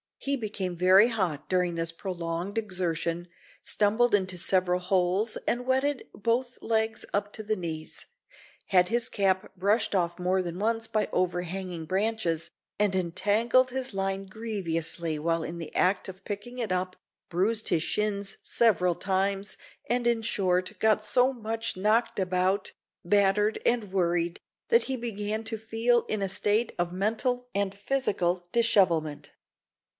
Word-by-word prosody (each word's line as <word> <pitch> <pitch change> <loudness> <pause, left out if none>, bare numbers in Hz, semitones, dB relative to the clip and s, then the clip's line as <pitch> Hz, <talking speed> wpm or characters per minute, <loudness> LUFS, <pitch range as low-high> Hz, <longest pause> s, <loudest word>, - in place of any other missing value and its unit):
He 280 0 -1
became 205 -7 -3
very 185 +5 +6
hot 185 -10 -2
during 180 -2 +1
this 165 0 -1
prolonged 175 +2 -4
exertion, 175 -4 -1 0.4
stumbled 220 +3 +2
into 185 -2 -1
several 180 0 +2
holes, 185 +4 +1
and 245 +1 0
wetted 265 +1 0
both 240 +4 -1
legs 220 -1 0
up 205 0 -1
to 220 - -4
the 215 +1 0
knees, 160 -4 -6 0.6
had 180 -2 +4
his 235 +1 0
cap 190 -2 +1
brushed 205 +3 +1
off 175 -1 0
more 185 +1 +1
than 175 0 -5
once 225 +1 0
by 215 -2 0
overhanging 180 -1 -2
branches, 185 -3 -1 0.3
and 205 -2 +2
entangled 210 +8 +2
his 260 -2 -3
line 195 0 -1
grievously 170 -6 -3
while 165 +2 0
in 165 +2 -5
the 160 -2 -8
act 185 +1 +2
of 190 0 -10
picking 210 +4 -6
it 225 -5 -2
up, 185 0 -1 0.3
bruised 210 +6 0
his 160 - +2
shins 205 0 -1
several 180 -6 +3
times, 195 +2 -1 0.3
and 240 0 0
in 235 -1 +2
short 185 -4 0
got 215 -1 +3
so 250 +5 +3
much 225 -1 -3
knocked 215 +4 +2
about, 185 +1 0 0.3
battered, 205 +3 +3
and 230 -5 +1
worried, 175 -2 0 0.3
that 465 0 +5
he 265 - -2
began 215 -2 -3
to 225 0 -4
feel 225 +2 +1
in 215 - -2
a 195 - -1
state 210 +4 +1
of 175 -1 -1
mental 235 +6 -1
and 200 -1 0
physical 195 -6 0
dishevelment. 180 -10 +2
195 Hz, 145 wpm, -28 LUFS, 180-225 Hz, 0.6 s, very